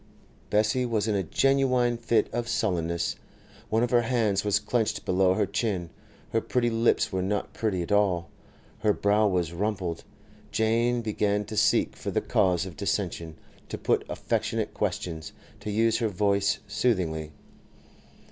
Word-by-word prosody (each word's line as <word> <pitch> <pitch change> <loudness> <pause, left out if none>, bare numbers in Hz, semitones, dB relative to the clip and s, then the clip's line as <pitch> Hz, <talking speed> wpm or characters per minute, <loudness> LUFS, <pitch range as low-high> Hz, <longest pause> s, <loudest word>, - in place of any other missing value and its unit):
Bessie 110 +4 +2
was 115 -3 0
in 110 - +1
a 100 - +1
genuine 125 - +2
fit 115 -2 +1
of 120 0 -2
sullenness. 85 -7 -1 0.5
One 110 +2 +2
of 120 - -1
her 120 -1 +5
hands 115 -5 +1
was 105 -1 +2
clenched 110 +2 -1
below 95 0 +3
her - - +2
chin; 95 -7 -2 0.4
her 115 - +1
pretty 120 0 0
lips 115 +1 +2
were 95 -1 -1
not 100 +2 -2
pretty 100 -6 -1
at 85 - -7
all; 95 -5 +2 0.5
her 105 -1 +3
brow 105 +2 +2
was 90 -4 0
rumpled. 95 -3 -2 0.5
Jane 115 +2 +1
began 105 -1 0
to 110 +1 -7
seek - - +2
for - - -5
the - - +1
cause 90 -1 +1
of 90 -4 -8
dissension, 80 +2 -2 0.3
to - - -4
put - - +1
affectionate - - -2
questions, 80 -2 -3 0.3
to 105 - -6
use 115 +2 +2
her 115 -2 +1
voice 100 +1 +1
soothingly. 85 -9 0
105 Hz, 155 wpm, -27 LUFS, 95-115 Hz, 0.5 s, her